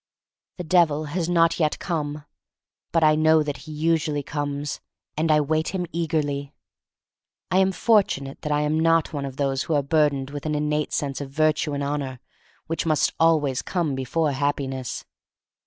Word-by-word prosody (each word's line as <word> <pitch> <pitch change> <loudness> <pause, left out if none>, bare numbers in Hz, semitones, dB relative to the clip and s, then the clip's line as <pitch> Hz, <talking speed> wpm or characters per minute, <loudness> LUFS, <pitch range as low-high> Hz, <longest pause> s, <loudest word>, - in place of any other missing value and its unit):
The 180 - -4
Devil 160 -3 +3
has 175 -1 -1
not 170 -1 +3
yet 155 -2 +1
come. 150 -4 -3 0.7
But 165 -1 +2
I 155 0 +6
know 155 0 +4
that 145 -1 -4
he - - -6
usually 155 -1 0
comes, 145 -1 -4 0.3
and 155 +1 +1
I 150 - +5
wait 155 +5 -1
him 180 -1 -1
eagerly. 150 -4 -2 1.0
I 185 - +4
am 190 0 +3
fortunate 185 -11 +1
that 150 - -3
I 150 0 +2
am 150 +1 +1
not 165 0 +2
one 140 -2 -3
of 135 -1 -7
those 135 -1 0
who 160 - -1
are 145 - +2
burdened 140 -2 +1
with 145 +1 -5
an 150 - 0
innate 150 0 -1
sense 140 -1 -2
of 140 - -6
virtue 155 +1 +1
and 140 0 -2
honor 140 -3 -3 0.5
which 165 0 -3
must 155 -2 +2
come 165 - +4
always 145 -5 +1
before 155 -2 -1
Happiness. 135 -2 -2
150 Hz, 170 wpm, -24 LUFS, 140-160 Hz, 1.0 s, I